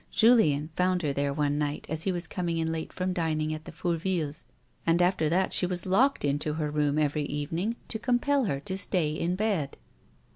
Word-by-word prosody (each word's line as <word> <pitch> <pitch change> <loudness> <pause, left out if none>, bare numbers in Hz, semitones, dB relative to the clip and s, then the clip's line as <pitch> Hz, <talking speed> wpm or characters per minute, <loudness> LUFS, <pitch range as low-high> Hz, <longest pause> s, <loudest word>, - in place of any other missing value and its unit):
Julien 165 -11 +4
found 180 -1 +1
her 145 -2 0
there 140 0 0
one 145 0 0
night 150 0 -2
as 160 +1 -3
he 195 - +2
was 175 -1 -2
coming 170 0 -2
in 160 0 0
late 160 -1 -4
from 185 0 -2
dining 155 -3 -1
at 155 0 -7
the - - -8
Fourvilles, 165 -3 -2 0.4
and 165 +1 +3
after 175 -3 +2
that 185 +3 +1
she 180 - +3
was 180 -1 -2
locked 240 - +3
into 145 +2 0
her 150 -1 -2
room 150 -1 +1
every 150 0 +1
evening 165 +10 -2
to 220 - -2
compel 260 +3 +2
her 140 -9 -1
to 190 +6 -4
stay 175 -6 0
in 170 +3 -1
bed. 190 -9 -1
165 Hz, 205 wpm, -28 LUFS, 150-185 Hz, 0.4 s, Julien